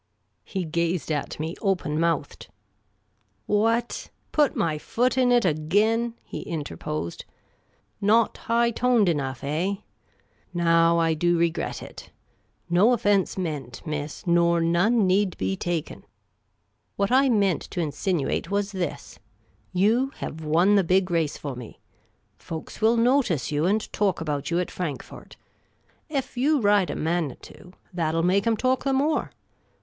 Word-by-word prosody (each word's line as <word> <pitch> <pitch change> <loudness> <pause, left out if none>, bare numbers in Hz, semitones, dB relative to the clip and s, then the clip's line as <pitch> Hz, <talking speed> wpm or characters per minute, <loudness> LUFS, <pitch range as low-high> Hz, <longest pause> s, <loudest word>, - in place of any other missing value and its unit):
He 190 -3 -4
gazed 170 +1 -1
at 150 -1 -3
me 160 +3 -3
open 180 -7 0
mouthed. 165 -2 -1 0.5
" 105 -3 -45
What? 225 +3 0 0.2
Put 295 -4 +2
my 155 -2 0
foot 250 +10 0
in 255 -1 +3
it 240 -4 +4
again?" 210 +9 +1
he - - -7
interposed. 85 - -5 0.4
" - - -42
Not 230 0 +3
high 235 +1 +1
toned 240 -3 +2
enough, 135 -6 -1
eh? 165 +8 -1 0.8
Now, 165 0 +4
I 165 -1 +2
do 175 +2 +1
regret 165 -1 -1
it. - - -11 0.6
No 180 +5 +4
ofience 205 -6 +2
meant, 145 -9 -5
miss, 150 -1 -5
nor 170 -1 +3
none 180 +7 +3
need 190 0 +1
be 95 0 -1
taken. 170 - -4 0.9
What 200 +1 0
I 270 +1 +5
meant 200 - +2
to - - -5
in 160 -4 -1
sinuate 175 -3 -1
was 200 0 -1
this: 175 -7 -5 0.5
you 220 +9 +2
liev 160 - -6
won 165 +6 +3
the 195 - +4
big 185 +1 +2
race 165 -3 0
for 140 -3 -6
me. 120 -3 -10 0.6
Folks 160 +5 -8
will 225 +2 +4
notice 230 - +2
you 150 +3 +1
and 210 +2 -1
talk 200 -4 +1
about 150 -3 -3
you 170 +1 +1
at 180 - -2
Frankfort. 165 -7 -6 0.7
Ef 275 -4 -3
you 290 +4 +3
ride 205 -4 +3
a - - -3
Manitou, 170 +2 -4 0.2
that 165 -3 -1
'11 165 +1 +1
make 195 +4 +2
'em 225 -1 +2
talk 255 +3 +1
the 270 0 +1
more. 290 +4 +1
180 Hz, 150 wpm, -25 LUFS, 160-220 Hz, 0.9 s, I